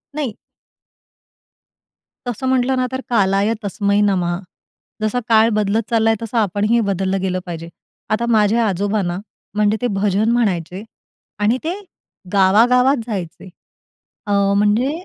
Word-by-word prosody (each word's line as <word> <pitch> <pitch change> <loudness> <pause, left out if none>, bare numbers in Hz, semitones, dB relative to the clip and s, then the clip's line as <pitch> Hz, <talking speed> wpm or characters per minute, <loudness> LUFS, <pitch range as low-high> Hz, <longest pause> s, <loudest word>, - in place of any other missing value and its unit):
नाही. 275 -8 -3 1.9
तसं 245 +2 -3
म्हटलं 260 0 +2
ना 255 0 +1
तर, 260 0 -3
कालाय 200 -1 +2
तस्मै 200 0 0
नमः 180 -3 0 0.7
जसा 215 +3 0
काळ 220 0 +6
बदलत 215 +2 +1
चाललाय 225 -1 +2
तसं 230 +1 -4
आपणही 210 +2 +2
बदललं 195 0 -1
गेलं 185 -1 -1
पाहिजे. 170 -2 -7 0.4
आता 220 +2 0
माझे 210 +1 +3
आजोबा 200 +2 0
ना, 175 -1 -3 0.4
म्हणजे 210 +1 +2
ते 245 - +1
भजन 210 +2 +2
म्हणायचे 190 -5 -1 0.6
आणि 215 +4 +2
ते 330 +2 -1 0.6
गावागावात 240 +8 +4
जायचे. 190 -4 -6 0.8
अ, - - -2 0.3
म्हणजे 210 +6 +2
210 Hz, 125 wpm, -19 LUFS, 195-235 Hz, 1.9 s, काळ